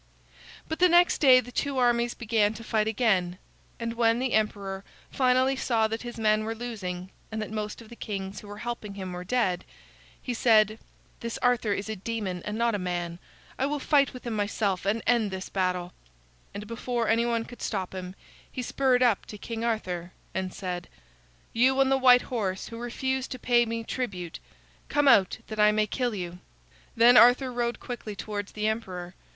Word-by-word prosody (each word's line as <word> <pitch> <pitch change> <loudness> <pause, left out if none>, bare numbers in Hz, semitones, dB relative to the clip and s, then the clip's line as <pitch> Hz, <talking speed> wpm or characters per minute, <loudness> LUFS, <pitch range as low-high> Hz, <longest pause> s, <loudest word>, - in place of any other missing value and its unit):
But 320 - -4
the 360 0 +6
next 350 +1 +5
day 260 -3 +7
the 245 +1 -11
two 280 +1 -2
armies 240 -1 +2
began 220 -2 +1
to 230 - -9
fight 215 -1 0
again, 195 -6 +1 0.4
and 230 0 -3
when 230 -1 +3
the 255 0 -1
emperor 200 -3 -1 0.3
finally 260 0 +3
saw 230 -4 +1
that 225 +1 -4
his 240 -1 -7
men 215 -1 +2
were 225 +1 -3
losing 190 -6 -5 0.2
and 220 - -3
that 215 0 -4
most 215 +1 -4
of 220 - -16
the 235 - -10
kings 195 -3 -5
who 210 - -12
were 205 0 -8
helping 230 -4 -5
him 190 -2 -5
were 180 0 -5
dead, 185 -4 0 0.6
he 250 - -4
said: 220 -2 +4 0.4
"This 235 0 -4
Arthur 245 -4 +2
is 200 +1 -3
a 220 - -3
demon 200 -3 -4
and 210 +1 -3
not 235 0 +2
a 205 - -1
man. 175 -1 -3 0.4
I 265 - +2
will 295 +1 -1
fight 280 0 +3
with 250 -1 -11
him 235 - -2
myself 205 -3 -1
and 220 +3 0
end 235 -3 +3
this 190 0 -6
battle." 180 -2 -1 0.6
And 205 +1 -7
before 230 +1 -2
any 230 +2 +2
one 230 -1 0
could 245 - -12
stop 190 -4 -3
him, 185 0 -6 0.4
he 255 - -4
spurred 255 0 +2
up 235 -5 +2
to 210 - -8
King 225 +2 -5
Arthur 185 -6 -2 0.2
and 190 -1 -2
said: 180 -2 -5 0.7
"You 260 +3 +3
on 270 -1 +4
the 270 - +4
white 250 -1 +6
horse 195 -6 -3
who 230 - -8
refuse 260 +2 -2
to 255 - -6
pay 240 -1 +3
me 230 0 -3
tribute, 190 -9 -4 0.5
come 290 -1 +2
out 205 -8 +5
that 215 -1 -7
I 210 0 +6
may 215 0 +2
kill 240 +1 -2
you." 180 -2 -5 0.6
Then 240 +1 +7
Arthur 250 +2 +6
rode 240 0 -1
quickly 230 -4 -6
towards 205 0 -5
the 215 0 -1
emperor. 185 -5 -3
225 Hz, 195 wpm, -27 LUFS, 200-245 Hz, 0.7 s, day